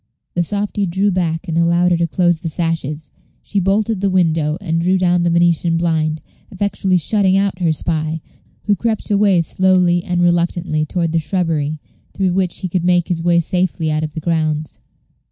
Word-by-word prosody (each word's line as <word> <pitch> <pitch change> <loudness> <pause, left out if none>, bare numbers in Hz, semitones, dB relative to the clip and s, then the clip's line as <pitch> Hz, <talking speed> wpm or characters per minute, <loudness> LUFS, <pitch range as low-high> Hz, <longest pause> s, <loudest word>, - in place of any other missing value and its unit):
The 175 - 0
softy 205 +2 -1
drew 195 +4 +1
back 165 -3 -2
and 165 0 0
allowed 170 +1 +2
her 175 - +3
to 170 0 0
close 175 0 +1
the 165 - -4
sashes; 155 -3 -3 0.3
she 205 - -1
bolted 200 +2 0
the 200 - +1
window, 165 -4 +1
and 165 -4 -1
drew 185 +2 +2
down 180 -1 +2
the 175 - +1
Venetian 170 0 +2
blind, 160 -2 0 0.3
effectually 195 -1 0
shutting 190 +2 +2
out 195 -2 0
her 170 -3 +1
spy, 155 0 -1 0.4
who 205 - +2
crept 220 0 -2
away 200 -3 +3
slowly 180 0 +2
and 175 0 0
reluctantly 170 -2 0
toward 170 -1 -1
the 165 - +1
shrubbery, 155 -3 -1 0.4
through 190 -2 0
which 185 -2 -1
he 185 - -2
could 180 0 -2
make 175 0 +2
his 170 -2 -1
way 170 0 +3
safely 170 -2 -1
out 155 0 -1
of 155 -1 -5
the 160 - -4
grounds. 155 -2 -2
175 Hz, 185 wpm, -18 LUFS, 165-185 Hz, 0.4 s, her